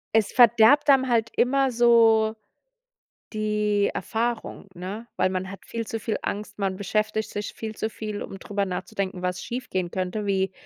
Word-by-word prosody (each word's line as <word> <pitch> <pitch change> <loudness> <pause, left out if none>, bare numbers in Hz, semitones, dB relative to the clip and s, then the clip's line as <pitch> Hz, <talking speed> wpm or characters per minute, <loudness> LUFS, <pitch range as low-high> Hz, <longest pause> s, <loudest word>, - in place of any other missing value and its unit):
Es 220 -2 +3
verdirbt 240 +4 +6
dann 260 -1 +5
halt 225 -2 +1
immer 270 +1 +2
so 225 -2 +4 1.0
die 210 -1 +1
Erfahrung, 230 -2 -3
ne? 195 +6 -6
Weil 185 - +2
man 185 0 -3
hat 195 +1 -10
viel 230 -1 -5
zu 225 - -4
viel 220 +1 -2
Angst, 205 0 -5
man 195 -2 -1
beschäftigt 215 +2 -1
sich 205 0 -4
viel 220 -1 -6
zu 220 - -2
viel, 215 -1 -6
um 195 - -7
drüber 200 -1 -2
nachzudenken, 185 0 -4
was 180 0 -2
schiefgehen 190 -8 -4
könnte, 185 +3 -3
wie 190 -1 0
215 Hz, 165 wpm, -25 LUFS, 195-230 Hz, 1.0 s, verdirbt